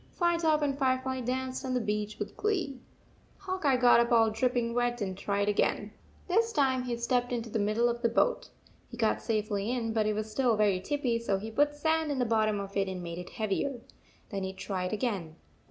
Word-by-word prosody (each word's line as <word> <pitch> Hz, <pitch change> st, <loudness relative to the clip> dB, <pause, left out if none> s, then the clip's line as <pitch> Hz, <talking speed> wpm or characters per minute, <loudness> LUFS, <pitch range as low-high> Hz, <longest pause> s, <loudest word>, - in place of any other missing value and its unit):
Firetop 335 Hz, -3 st, +2 dB
and 280 Hz, -2 st, +1 dB
Firefly 260 Hz, -1 st, 0 dB
danced 255 Hz, +2 st, -3 dB
on 260 Hz, -1 st, -2 dB
the -, -, +2 dB
beach 210 Hz, -1 st, -2 dB
with -, -, -5 dB
glee. 360 Hz, -11 st, -1 dB, 0.6 s
Hawk 375 Hz, -3 st, -4 dB
Eye 270 Hz, -2 st, +4 dB
got 245 Hz, -1 st, +6 dB
up 235 Hz, +1 st, +2 dB
all 225 Hz, -2 st, +5 dB
dripping 240 Hz, +1 st, 0 dB
wet 245 Hz, 0 st, 0 dB
and 190 Hz, -3 st, -3 dB
tried 200 Hz, +1 st, -1 dB
again. 205 Hz, -, +1 dB, 0.4 s
This 450 Hz, +5 st, +2 dB
time 270 Hz, -, +2 dB
he 245 Hz, -1 st, -3 dB
stepped 245 Hz, +1 st, 0 dB
into 230 Hz, -2 st, -3 dB
the 225 Hz, -, 0 dB
middle 215 Hz, +4 st, +2 dB
of 235 Hz, 0 st, -2 dB
the 235 Hz, -, +2 dB
boat. 475 Hz, -, +1 dB, 0.4 s
He 235 Hz, -, -9 dB
got 225 Hz, -2 st, +1 dB
safely 215 Hz, -2 st, -1 dB
in, 230 Hz, -3 st, -1 dB
but 215 Hz, -1 st, +1 dB
it 215 Hz, -, +1 dB
was 215 Hz, 0 st, -3 dB
still 245 Hz, 0 st, +2 dB
very 205 Hz, -3 st, +3 dB
tippy, 245 Hz, +2 st, -1 dB
so 205 Hz, -4 st, 0 dB
he 220 Hz, +3 st, -6 dB
put 290 Hz, +5 st, +2 dB
sand 315 Hz, +1 st, +1 dB
in 280 Hz, -, -1 dB
the 250 Hz, -, +1 dB
bottom 215 Hz, -2 st, +2 dB
of 200 Hz, 0 st, -7 dB
it 195 Hz, -1 st, +1 dB
and 185 Hz, -1 st, -5 dB
made 170 Hz, 0 st, -5 dB
it 180 Hz, -, -8 dB
heavier. 220 Hz, +5 st, -2 dB, 0.5 s
Then 200 Hz, -2 st, -3 dB
he 190 Hz, 0 st, -3 dB
tried 185 Hz, -1 st, -3 dB
again. 200 Hz, -8 st, -2 dB
235 Hz, 215 wpm, -30 LUFS, 210-260 Hz, 0.6 s, got